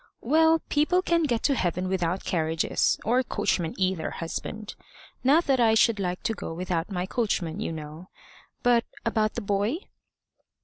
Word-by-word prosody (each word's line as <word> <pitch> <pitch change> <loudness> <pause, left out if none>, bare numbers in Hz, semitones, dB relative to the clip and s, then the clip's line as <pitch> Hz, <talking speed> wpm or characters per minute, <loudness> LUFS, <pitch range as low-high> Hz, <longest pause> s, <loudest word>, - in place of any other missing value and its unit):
"Well, 320 +5 +3
people 335 +5 +2
can 335 -3 +2
get 235 -5 -1
to 285 - +3
heaven 180 -5 -1
without 185 -1 -1
carriages 160 -2 +1
or 245 +4 +3
coachmen 195 -8 -1
either, 185 -2 0
husband. 210 +5 -5 0.5
Not 295 +7 +4
that 270 -2 +2
I 225 -2 +4
should 220 -1 +4
like 180 -2 -3
to 225 - 0
go 165 - -6
without 175 0 -2
my 180 -2 -2
coachman, 195 -6 -1
you 220 - -2
know. 155 +3 -8 0.5
But 240 -1 +4 0.2
about 220 -2 +1
the 235 - -2
boy?" 205 +6 0
205 Hz, 160 wpm, -26 LUFS, 180-245 Hz, 0.5 s, Not